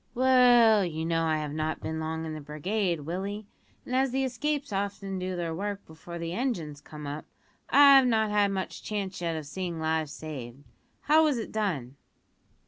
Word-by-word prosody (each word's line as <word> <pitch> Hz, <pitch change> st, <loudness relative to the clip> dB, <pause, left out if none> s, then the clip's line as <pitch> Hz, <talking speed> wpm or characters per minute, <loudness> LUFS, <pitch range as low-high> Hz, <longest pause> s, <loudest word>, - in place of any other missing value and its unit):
"Well, 245 Hz, -4 st, +6 dB
you 160 Hz, -2 st, -3 dB
know 165 Hz, 0 st, +1 dB
I 160 Hz, -1 st, +1 dB
have 150 Hz, -1 st, -4 dB
not 155 Hz, +1 st, -2 dB
been 160 Hz, 0 st, -4 dB
long 160 Hz, 0 st, -3 dB
in 160 Hz, -, -5 dB
the 155 Hz, -, -6 dB
brigade, 170 Hz, +4 st, -2 dB
Willie, 195 Hz, +7 st, -4 dB, 0.4 s
and 255 Hz, -, -3 dB
as 265 Hz, +1 st, +3 dB
the 265 Hz, +2 st, 0 dB
escapes 280 Hz, +1 st, -2 dB
often 195 Hz, -1 st, -3 dB
do 185 Hz, 0 st, -3 dB
their 170 Hz, -2 st, -3 dB
work 200 Hz, +3 st, -4 dB
before 160 Hz, +2 st, -10 dB
the 170 Hz, 0 st, -4 dB
engines 175 Hz, -, -3 dB
come 150 Hz, 0 st, -10 dB
up, 145 Hz, +2 st, -5 dB, 0.4 s
I've 275 Hz, -2 st, +8 dB
not 220 Hz, -3 st, +2 dB
had 205 Hz, -1 st, +3 dB
much 190 Hz, -1 st, -4 dB
chance 200 Hz, -4 st, -4 dB
yet 165 Hz, -1 st, -1 dB
of 155 Hz, -2 st, -5 dB
seeing 170 Hz, +2 st, -4 dB
lives 160 Hz, -1 st, -1 dB
saved. 140 Hz, -4 st, -8 dB, 0.4 s
How 310 Hz, +2 st, +5 dB
was 295 Hz, -5 st, +2 dB
it 225 Hz, -, -5 dB
done?" 150 Hz, -, -2 dB
185 Hz, 185 wpm, -28 LUFS, 160-220 Hz, 0.4 s, I've